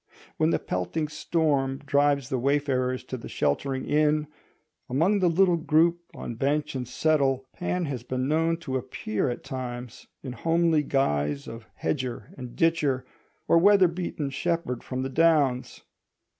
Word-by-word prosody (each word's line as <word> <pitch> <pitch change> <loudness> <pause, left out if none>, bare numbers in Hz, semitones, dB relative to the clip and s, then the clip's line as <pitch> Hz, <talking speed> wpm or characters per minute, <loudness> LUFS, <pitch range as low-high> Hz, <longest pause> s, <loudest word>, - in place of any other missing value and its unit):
When 155 0 +3
the - - +2
pelting 150 - -3
storm 145 -4 0
drives 140 -1 +1
the 130 - -1
wayfarers 130 -2 0
to 130 - -6
the 115 - -9
sheltering 130 - -1
inn, 150 0 +2 0.6
among 170 +11 +2
the 180 -2 +3
little 175 +1 +3
group 165 +1 +3 0.2
on - - -5
bench 145 +5 -1
and 130 -3 -4
settle 135 -1 +1
Pan 180 0 -2
has 135 -5 -4
been 130 +1 -2
known 165 +2 +1
to 130 -4 -2
appear 125 -3 -2
at 120 - -5
times, 125 -2 -6 0.2
in 130 -3 -5
homely 165 +1 +2
guise 75 - 0
of 115 -1 -9
hedger 130 -4 -3
and 125 -2 -9
ditcher 150 -6 +1 0.4
or 170 - +5
weather 195 0 +6
beaten 165 -5 -4
shepherd 165 -5 -2
from 130 0 -3
the 135 - -3
downs. 145 -4 +2
140 Hz, 150 wpm, -26 LUFS, 130-165 Hz, 0.6 s, weather